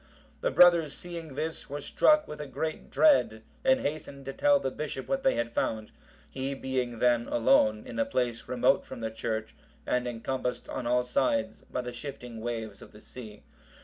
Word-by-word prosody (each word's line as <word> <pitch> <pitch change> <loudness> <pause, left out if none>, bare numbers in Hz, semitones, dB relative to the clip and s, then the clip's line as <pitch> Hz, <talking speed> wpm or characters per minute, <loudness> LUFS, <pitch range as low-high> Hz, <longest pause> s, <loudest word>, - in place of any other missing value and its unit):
The - - 0
brothers 170 - +6
seeing 165 -5 -7
this, 160 +1 -4
were 145 +1 -4
struck 305 - +3
with 150 0 -7
a 150 - -6
great 155 +4 -4
dread, 110 - +4 0.2
and 265 0 +4
hastened 145 -2 -4
to 135 - -5
tell 145 0 +4
the 135 -1 -2
bishop 140 -2 -5
what 270 0 0
they 265 - +3
had 120 0 -1
found; 110 -2 -2 0.4
he 135 +1 -4
being 130 -3 -2
then 120 0 +2
alone 110 -2 +3
in - - -6
a 280 - +3
place 120 - -1
remote 125 -1 +3
from - - -9
the 110 0 -2
church, 110 -2 -3 0.3
and 125 0 0
encompassed 125 +2 -3
on 120 - -4
all 125 +1 +3
sides 280 - 0
by - - -1
the 125 0 -6
shifting 120 -3 -7
waves 110 -3 -4
of - - -13
the 105 - -13
sea. 110 -3 -11
130 Hz, 185 wpm, -29 LUFS, 120-150 Hz, 0.4 s, brothers